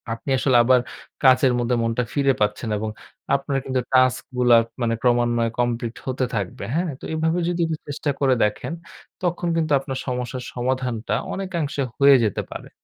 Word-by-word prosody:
আপনি 115 Hz, +4 st, -9 dB
আসলে 130 Hz, -2 st, +3 dB
আবার 125 Hz, +1 st, +5 dB, 0.4 s
কাজের 130 Hz, -1 st, +5 dB
মধ্যে 120 Hz, +1 st, +1 dB
মনটা 115 Hz, +2 st, 0 dB
ফিরে 140 Hz, -2 st, +3 dB
পাচ্ছেন 105 Hz, +2 st, 0 dB
এবং 110 Hz, +1 st, -3 dB, 0.5 s
আপনার 140 Hz, 0 st, -1 dB
কিন্তু 130 Hz, -1 st, 0 dB
টাস্ক 130 Hz, -1 st, +4 dB
গুলা 120 Hz, -1 st, +6 dB, 0.2 s
মানে 115 Hz, -1 st, +1 dB
ক্রমান্বয়ে 120 Hz, -1 st, +2 dB
কমপ্লিট 120 Hz, -1 st, -1 dB
হতে 130 Hz, 0 st, -1 dB
থাকবে। 100 Hz, -3 st, -4 dB
হ্যাঁ? 170 Hz, -1 st, 0 dB
তো -, -, -23 dB
এভাবে 160 Hz, +2 st, 0 dB
যদি 175 Hz, -, -2 dB
একটু 160 Hz, -1 st, -2 dB
চেষ্টা 145 Hz, +1 st, -3 dB
করে 135 Hz, -2 st, +3 dB
দেখেন, 105 Hz, +9 st, -1 dB, 0.5 s
তখন 175 Hz, 0 st, -1 dB
কিন্তু 160 Hz, -2 st, 0 dB
আপনার 135 Hz, -1 st, -5 dB
সমস্যার 125 Hz, 0 st, -3 dB
সমাধানটা 125 Hz, -2 st, -2 dB, 0.2 s
অনেকাংশে 170 Hz, -7 st, -3 dB, 0.2 s
হয়ে 140 Hz, 0 st, +8 dB
যেতে 105 Hz, -, -1 dB
পারে। -, -, -8 dB
130 Hz, 165 wpm, -23 LUFS, 120-140 Hz, 0.5 s, হয়ে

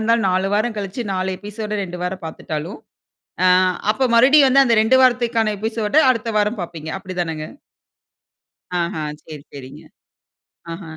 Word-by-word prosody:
இருந்தாலும் 225 Hz, -1 st, +2 dB
4 185 Hz, +1 st, 0 dB
வாரம் 215 Hz, +2 st, 0 dB
கழிச்சு 200 Hz, +5 st, -4 dB
4 185 Hz, 0 st, -2 dB
எபிசோடு 210 Hz, 0 st, -5 dB
2 180 Hz, -2 st, -7 dB
வாரம் 180 Hz, -1 st, -4 dB
பார்த்துட்டாலும், 160 Hz, +3 st, -6 dB, 0.7 s
ஆ -, -, +6 dB, 0.4 s
அப்ப 260 Hz, +2 st, 0 dB
மறுடியும் 275 Hz, +4 st, +6 dB
வந்து 275 Hz, +1 st, +5 dB
அந்த 235 Hz, -, +3 dB
2 245 Hz, +4 st, +4 dB
வாரத்துக்கான 230 Hz, -3 st, +2 dB
எபிசோட 220 Hz, +1 st, -3 dB, 0.2 s
அடுத்த 230 Hz, -2 st, -3 dB
வாரம் 210 Hz, +1 st, -1 dB
பாப்பீங்க. 165 Hz, -2 st, -7 dB
அப்டிதானங்க 175 Hz, -5 st, -4 dB, 1.3 s
ஆஹ 170 Hz, 0 st, -2 dB, 0.3 s
சரி, 150 Hz, -3 st, -10 dB
சரிங்க. 135 Hz, -2 st, -11 dB, 0.9 s
ஆஹ. 165 Hz, +4 st, -8 dB
205 Hz, 135 wpm, -20 LUFS, 175-230 Hz, 1.3 s, ஆ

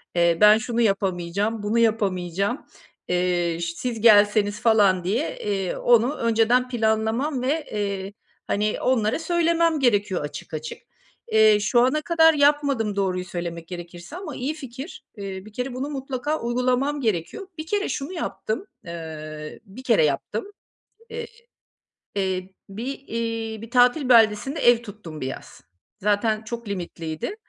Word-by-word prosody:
eee, 170 Hz, -1 st, +3 dB
ben 210 Hz, +1 st, +8 dB
şunu 235 Hz, +1 st, -1 dB
yapamayacağım, 195 Hz, +1 st, 0 dB
bunu 220 Hz, +3 st, +1 dB
yapamayacağım, 200 Hz, -, 0 dB, 0.4 s
eee, 175 Hz, -2 st, 0 dB
ş 170 Hz, 0 st, -2 dB
siz 235 Hz, 0 st, -4 dB
gelseniz, 205 Hz, -1 st, +5 dB
falan, 205 Hz, -5 st, +4 dB
diye, 225 Hz, -, -1 dB
eee, 195 Hz, -3 st, -2 dB
onu 240 Hz, +4 st, +3 dB
önceden 230 Hz, +2 st, +2 dB
planlamam 230 Hz, +4 st, 0 dB
ve, 290 Hz, +5 st, 0 dB
eee, 200 Hz, -1 st, -3 dB, 0.3 s
hani, 210 Hz, +1 st, 0 dB
onlara 230 Hz, -1 st, +1 dB
söylemem 335 Hz, -1 st, +2 dB
gerekiyor 205 Hz, -7 st, +2 dB
açık 145 Hz, +2 st, -7 dB
açık. 155 Hz, 0 st, -5 dB, 0.5 s
Eee, 215 Hz, -1 st, +6 dB
şu 240 Hz, +4 st, +2 dB
ana 260 Hz, +5 st, +2 dB
kadar 325 Hz, 0 st, +5 dB
yapmadım 285 Hz, -7 st, +2 dB
doğruyu 185 Hz, -2 st, -1 dB
söylemek 170 Hz, -2 st, -5 dB
gerekirse 175 Hz, -, -9 dB
ama 355 Hz, -6 st, -6 dB
iyi 270 Hz, +5 st, -2 dB
fikir. 270 Hz, +1 st, -9 dB
Eee, 195 Hz, -1 st, -6 dB
bir 215 Hz, -, -13 dB
kere 250 Hz, +2 st, -3 dB
bunu 265 Hz, +3 st, -3 dB
mutlaka 275 Hz, +1 st, -3 dB
uygulamam 250 Hz, +4 st, 0 dB
gerekiyor. 220 Hz, -, -2 dB
Bir 315 Hz, -, -5 dB
kere 410 Hz, +1 st, 0 dB
şunu 285 Hz, +6 st, -4 dB
yaptım; 330 Hz, -, -3 dB, 0.2 s
eee, 155 Hz, -2 st, -7 dB
1 215 Hz, +6 st, -12 dB
kere 225 Hz, -11 st, +4 dB
yaptım, 210 Hz, -, -2 dB, 0.6 s
eee, 465 Hz, 0 st, -5 dB, 0.9 s
eee 190 Hz, -1 st, -1 dB, 0.2 s
bir, 220 Hz, +6 st, -6 dB, 0.2 s
iii, 225 Hz, -1 st, -3 dB
bir 230 Hz, -, -9 dB
tatil 250 Hz, +3 st, +4 dB
beldesinde 230 Hz, +4 st, +4 dB
ev 240 Hz, -1 st, +5 dB
tuttum 200 Hz, -8 st, -9 dB
bir 130 Hz, -, -3 dB
yaz. 135 Hz, -, -8 dB, 0.4 s
Zaten 215 Hz, +2 st, +1 dB
çok 235 Hz, 0 st, -6 dB
limitliydi. 170 Hz, -, -4 dB
220 Hz, 140 wpm, -24 LUFS, 190-255 Hz, 0.9 s, ben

